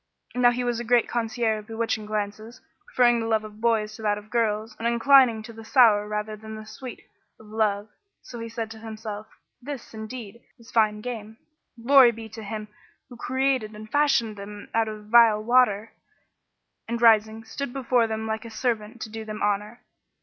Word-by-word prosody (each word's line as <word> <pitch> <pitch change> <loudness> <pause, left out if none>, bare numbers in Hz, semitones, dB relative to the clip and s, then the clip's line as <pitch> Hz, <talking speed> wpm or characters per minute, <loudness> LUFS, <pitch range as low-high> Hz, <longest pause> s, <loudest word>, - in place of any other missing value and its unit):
Now 245 0 +5
he 245 +1 -1
was 240 -1 -1
a - - -3
great 240 0 +3
connoisseur 230 -2 -1
of 210 - -13
bewitching 225 -1 -2
glances, 215 +2 -4 0.3
preferring 240 -1 +3
the 225 - -2
love 220 -1 +1
of 215 0 -11
boys 220 -2 +1
to 225 - -11
that 210 -1 +1
of 210 +1 -12
girls 220 -2 0
and 230 - -1
inclining 235 -1 +5
to 230 +1 -10
the 225 0 -11
sour 220 -4 +5
rather 210 0 -3
than 220 +1 -9
the 215 0 -9
sweet 255 +2 -9 0.4
of 220 - -15
love. 210 -1 0 0.4
So 240 - -9
he 230 0 -6
said 225 -1 -5
to 220 - -10
himself, 215 -1 -7 0.3
"This, 270 -2 -8
indeed, 220 0 -8 0.2
is 235 0 -16
fine 215 -2 +2
game. 225 -2 -6 0.5
Glory 270 -2 +8
be 225 -1 -9
to 220 +1 -9
Him 215 0 -6 0.4
who 245 - -11
created 260 -3 -1
and 215 0 -11
fashioned 275 -7 +2
them 205 +1 -9
out 225 0 +2
of 215 -1 -7
vile 220 -1 +5
water!"[FN#16] 225 -3 +3 0.9
and 235 +1 -2
rising 220 -1 +4
stood 245 +4 -5
before 250 -3 +1
them 220 0 -3
like 220 0 -3
a 230 - -8
servant 225 -1 -3
to - - -7
do 225 0 -6
them 215 0 -6
honour. 210 +3 -1
225 Hz, 190 wpm, -25 LUFS, 215-235 Hz, 0.9 s, Glory